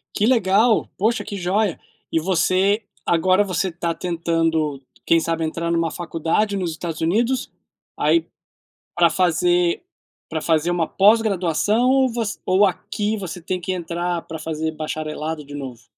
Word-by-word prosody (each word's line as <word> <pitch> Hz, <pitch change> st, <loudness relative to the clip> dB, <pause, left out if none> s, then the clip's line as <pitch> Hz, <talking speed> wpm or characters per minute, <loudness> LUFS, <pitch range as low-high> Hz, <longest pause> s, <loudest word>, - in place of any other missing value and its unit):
Que 210 Hz, -, +2 dB
legal, 220 Hz, -1 st, +3 dB
poxa 220 Hz, +4 st, +1 dB
que 205 Hz, -, -6 dB
jóia. 195 Hz, +1 st, 0 dB, 0.3 s
E 165 Hz, -, +2 dB
você 190 Hz, +4 st, +2 dB, 0.2 s
agora 185 Hz, +4 st, +3 dB
você 185 Hz, -1 st, -1 dB
tá 170 Hz, 0 st, -2 dB
tentando 165 Hz, -4 st, 0 dB, 0.3 s
quem 165 Hz, -, +4 dB
sabe 165 Hz, 0 st, -1 dB
entrar 170 Hz, +1 st, -2 dB
numa 165 Hz, -1 st, +1 dB
faculdade 175 Hz, +4 st, -1 dB
nos 180 Hz, -3 st, -2 dB
Estados 160 Hz, 0 st, -5 dB
Unidos, 230 Hz, +10 st, +1 dB, 0.5 s
aí 335 Hz, -, +2 dB, 0.7 s
pra 170 Hz, -1 st, +5 dB
fazer 175 Hz, -, +2 dB, 0.5 s
pra 160 Hz, -1 st, -3 dB
fazer 160 Hz, 0 st, +1 dB
uma 170 Hz, -2 st, 0 dB
pós-graduação? 210 Hz, +1 st, +3 dB
Ou 265 Hz, -1 st, +4 dB
vo 230 Hz, -1 st, -1 dB, 0.2 s
ou 190 Hz, +3 st, +4 dB
aqui 205 Hz, +3 st, -2 dB
você 180 Hz, -2 st, -6 dB
tem 185 Hz, +2 st, -3 dB
que 185 Hz, -, -3 dB
entrar 175 Hz, -1 st, -2 dB
pra 160 Hz, -, -7 dB
fazer 160 Hz, 0 st, -3 dB
bacharelado 155 Hz, 0 st, -4 dB
de 145 Hz, -, -11 dB
novo? 130 Hz, -5 st, -7 dB
175 Hz, 145 wpm, -21 LUFS, 165-200 Hz, 0.7 s, pra